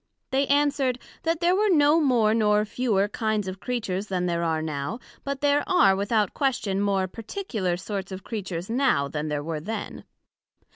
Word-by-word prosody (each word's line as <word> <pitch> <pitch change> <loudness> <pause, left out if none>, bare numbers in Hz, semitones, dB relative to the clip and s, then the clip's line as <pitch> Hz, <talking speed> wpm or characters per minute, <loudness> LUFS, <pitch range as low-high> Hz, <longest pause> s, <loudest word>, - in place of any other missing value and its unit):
They 270 +1 +2
answered, 280 -3 +2 0.2
That 330 +1 -1
there 350 +2 +4
were 420 +2 +2
no 300 -2 +5
more 235 -7 +3
nor 210 -1 +3
fewer 210 -3 +1
kinds 215 -1 -1
of 185 0 -5
Creatures 210 -5 -3
then 180 -2 -1
there 170 -1 0
are 160 -1 0
now; 155 - -3 0.2
but 280 -1 -4
there 290 0 +3
are, 355 - +5
without 205 +1 +1
question, 225 -8 0
more 195 -2 +1
particular 215 - -3
sorts 195 +1 -5
of 190 +1 -7
Creatures 185 -5 -5
now, 235 - +2
then 150 +2 -4
there 150 -1 -2
were 160 0 -3
then. 220 +9 -5
210 Hz, 175 wpm, -25 LUFS, 185-270 Hz, 0.2 s, no